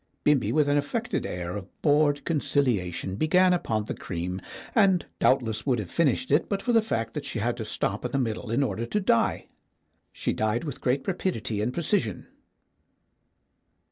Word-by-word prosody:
Bimbi 150 Hz, -3 st, +3 dB
with 150 Hz, -2 st, +3 dB
an 145 Hz, 0 st, +3 dB
affected 220 Hz, +12 st, -2 dB
air 90 Hz, 0 st, -4 dB
of 100 Hz, -2 st, -6 dB, 0.2 s
bored 145 Hz, -1 st, +3 dB
conciliation 105 Hz, -, 0 dB
began 180 Hz, -, +4 dB
upon 110 Hz, -11 st, -1 dB
the -, -, -3 dB
cream, 90 Hz, +1 st, -4 dB, 0.3 s
and 195 Hz, -6 st, +4 dB
doubtless 110 Hz, -4 st, +2 dB
would 125 Hz, -3 st, +3 dB
have 100 Hz, -6 st, -5 dB
finished 170 Hz, -, +1 dB
it -, -, +3 dB
but 200 Hz, -, 0 dB
for 240 Hz, +4 st, 0 dB
the 225 Hz, -, +6 dB
fact 115 Hz, -, -2 dB
that -, -, -4 dB
she -, -, -3 dB
had -, -, 0 dB
to -, -, -4 dB
stop -, -, -2 dB
in -, -, -3 dB
the -, -, 0 dB
middle 115 Hz, -2 st, -2 dB
in 120 Hz, +5 st, +2 dB
order 115 Hz, -3 st, -2 dB
to 210 Hz, -, 0 dB
die. 150 Hz, -, +2 dB, 0.7 s
She -, -, -2 dB
died 110 Hz, +2 st, 0 dB
with 145 Hz, -5 st, -6 dB
great 130 Hz, +2 st, 0 dB
rapidity 170 Hz, -, -1 dB
and 115 Hz, +4 st, 0 dB
precision. 165 Hz, -, -1 dB
135 Hz, 175 wpm, -27 LUFS, 110-170 Hz, 0.7 s, the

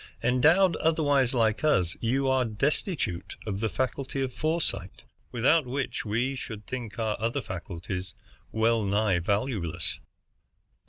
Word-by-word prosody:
Endowed 160 Hz, +9 st, +4 dB
otherwise 145 Hz, -5 st, +2 dB
like 110 Hz, -2 st, +1 dB
us, 90 Hz, -, +3 dB
you 135 Hz, +4 st, +1 dB
are 130 Hz, -1 st, +3 dB
destitute 120 Hz, -, -1 dB
of 100 Hz, -3 st, -3 dB
the 110 Hz, 0 st, 0 dB
faculty 130 Hz, +6 st, -2 dB
of 130 Hz, -1 st, -3 dB
foresight, 155 Hz, -, -2 dB, 0.3 s
without 130 Hz, +5 st, +3 dB
which 135 Hz, 0 st, -3 dB
we 120 Hz, +6 st, 0 dB
should 110 Hz, -5 st, -7 dB
think 120 Hz, -4 st, -6 dB
our 110 Hz, -2 st, 0 dB
other 115 Hz, +6 st, 0 dB
faculties 95 Hz, -2 st, -6 dB, 0.4 s
well 115 Hz, 0 st, +2 dB
nigh 100 Hz, -2 st, +2 dB
valueless." 100 Hz, -, -1 dB
115 Hz, 125 wpm, -28 LUFS, 105-135 Hz, 0.4 s, Endowed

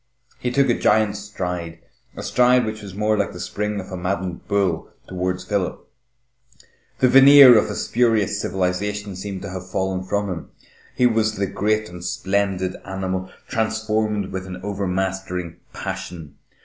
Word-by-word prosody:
He 125 Hz, -, -1 dB
took 140 Hz, +2 st, +2 dB
a 120 Hz, -, +3 dB
giant 105 Hz, -1 st, +3 dB
stride, 90 Hz, -5 st, -5 dB, 0.4 s
a -, -, -5 dB
stride 125 Hz, 0 st, +4 dB
which 110 Hz, 0 st, -5 dB
was 100 Hz, -3 st, -9 dB
more 105 Hz, +1 st, +1 dB
like 100 Hz, -1 st, -1 dB
the 90 Hz, -, -9 dB
spring 105 Hz, +3 st, -3 dB
of 95 Hz, -, -8 dB
a -, -, -4 dB
maddened 90 Hz, -1 st, -3 dB
bull, 95 Hz, -5 st, 0 dB, 0.2 s
towards 90 Hz, 0 st, -2 dB
Philip. 100 Hz, -4 st, -2 dB, 1.1 s
The 130 Hz, -, +4 dB
veneer 135 Hz, 0 st, +9 dB
of 110 Hz, -, +3 dB
a -, -, -4 dB
spurious 110 Hz, -4 st, +1 dB
civilisation 100 Hz, +2 st, -2 dB
seemed 95 Hz, 0 st, -6 dB
to -, -, -6 dB
have 95 Hz, 0 st, -7 dB
fallen 95 Hz, -1 st, -1 dB
from 100 Hz, +2 st, -1 dB
him. 90 Hz, -3 st, -5 dB, 0.5 s
He 125 Hz, -, +3 dB
was 110 Hz, -2 st, +2 dB
the 100 Hz, -, 0 dB
great 110 Hz, +3 st, 0 dB
and 90 Hz, -2 st, -10 dB
splendid 95 Hz, -1 st, -1 dB
animal, 95 Hz, -1 st, -3 dB, 0.2 s
transformed 110 Hz, -2 st, -1 dB
with 95 Hz, 0 st, -5 dB
an 90 Hz, 0 st, -7 dB
overmastering 95 Hz, -3 st, -3 dB
passion. 95 Hz, -6 st, -6 dB
100 Hz, 155 wpm, -22 LUFS, 95-110 Hz, 1.1 s, veneer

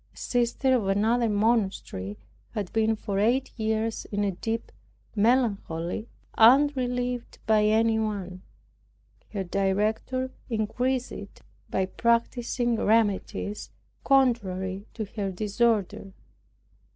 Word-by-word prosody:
A -, -, -21 dB
sister 245 Hz, +2 st, +1 dB
of 220 Hz, -6 st, 0 dB
another 225 Hz, +4 st, +2 dB
monastery 205 Hz, -, 0 dB, 0.4 s
had 205 Hz, -4 st, -3 dB
been 220 Hz, 0 st, +2 dB
for 200 Hz, -2 st, -3 dB
eight 245 Hz, +6 st, +2 dB
years 220 Hz, 0 st, -1 dB
in 205 Hz, 0 st, -2 dB
a 200 Hz, -, +1 dB
deep 225 Hz, +5 st, -4 dB, 0.4 s
melancholy 210 Hz, -5 st, +1 dB, 0.3 s
unrelieved 250 Hz, -1 st, +3 dB
by 215 Hz, -1 st, +4 dB
anyone. 215 Hz, -4 st, +1 dB, 0.9 s
Her 200 Hz, -3 st, -3 dB
director 210 Hz, +7 st, 0 dB, 0.2 s
increased 245 Hz, +3 st, -1 dB
it, -, -, -10 dB, 0.3 s
by 190 Hz, -, 0 dB
practicing 235 Hz, +3 st, 0 dB
remedies 210 Hz, -1 st, 0 dB, 0.3 s
contrary 200 Hz, -8 st, +1 dB
to 220 Hz, -, -3 dB
her 200 Hz, -1 st, -4 dB
disorder. 205 Hz, -1 st, 0 dB
220 Hz, 100 wpm, -27 LUFS, 200-240 Hz, 0.9 s, by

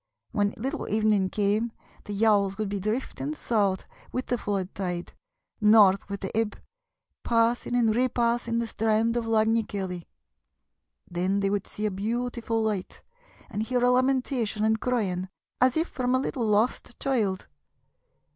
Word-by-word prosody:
When 205 Hz, -1 st, 0 dB
little 270 Hz, +8 st, -3 dB
evening 215 Hz, -2 st, +2 dB
came, 210 Hz, +3 st, 0 dB, 0.3 s
the 205 Hz, -, -5 dB
yawls 200 Hz, -2 st, +3 dB
would 215 Hz, -2 st, -2 dB
be 200 Hz, 0 st, -2 dB
drifting 250 Hz, +8 st, -3 dB
south 205 Hz, -9 st, 0 dB, 0.3 s
with 255 Hz, -, -2 dB
the 245 Hz, -, 0 dB
flood 195 Hz, -3 st, -2 dB
tide, 180 Hz, -2 st, -4 dB, 0.5 s
north 210 Hz, -2 st, +6 dB
with 200 Hz, 0 st, -4 dB
the 190 Hz, -, -5 dB
ebb, 220 Hz, -1 st, 0 dB, 0.6 s
passing 235 Hz, +1 st, +1 dB
and 225 Hz, -3 st, +3 dB
repassing 235 Hz, -1 st, +1 dB
the 235 Hz, -, 0 dB
strand 225 Hz, +1 st, +1 dB
of 235 Hz, -1 st, -1 dB
Lag 220 Hz, -1 st, +3 dB
ny 225 Hz, +1 st, +3 dB
Keilley. 190 Hz, -5 st, -5 dB, 1.0 s
Then 185 Hz, +3 st, 0 dB
they 195 Hz, 0 st, +1 dB
would 200 Hz, -1 st, -1 dB
see 210 Hz, -, -4 dB
a 210 Hz, -, +1 dB
beautiful 225 Hz, +2 st, -2 dB
light 210 Hz, -4 st, -3 dB, 0.4 s
and 205 Hz, -, -4 dB
hear 245 Hz, +2 st, 0 dB
a 250 Hz, -, +5 dB
lamentation 250 Hz, -4 st, +1 dB
and 220 Hz, 0 st, +2 dB
crying, 190 Hz, -7 st, -1 dB, 0.3 s
as 255 Hz, +3 st, +4 dB
if 325 Hz, +2 st, +1 dB
from 255 Hz, 0 st, 0 dB
a -, -, +3 dB
little 250 Hz, -3 st, -2 dB
lost 215 Hz, +3 st, 0 dB
child. 215 Hz, -9 st, 0 dB
220 Hz, 155 wpm, -27 LUFS, 200-240 Hz, 1.0 s, north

